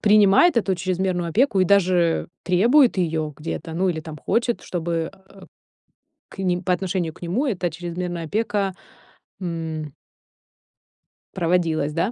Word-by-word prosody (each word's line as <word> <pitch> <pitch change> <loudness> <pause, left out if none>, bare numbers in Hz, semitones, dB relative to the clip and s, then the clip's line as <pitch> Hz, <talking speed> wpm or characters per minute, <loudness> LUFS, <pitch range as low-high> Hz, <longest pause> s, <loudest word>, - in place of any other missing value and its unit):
принимает 210 - +5
эту 195 -4 +2
чрезмерную 180 -1 -1
опеку 215 - +2
и - - +5
даже 180 -3 +2 0.2
требует 235 +9 +4
её 160 -3 -1
где-то, 160 +1 -5
ну 185 +2 +1
или 160 -2 -3
там 155 -1 -9
хочет, 235 - 0
чтобы, 165 -2 -2
э, 190 +1 -19
э, - - -12 0.8
к - - -15
ним 180 -1 0
по 185 - 0
отношению 180 -2 -2
к - - -19
нему 190 - 0
эта 185 -7 -1
чрезмерная 175 +1 -4
опека, 200 +1 -1 0.7
м 160 -4 -4 1.4
проводилась, 165 -4 0
да? 170 +7 0
180 Hz, 140 wpm, -23 LUFS, 165-195 Hz, 1.4 s, принимает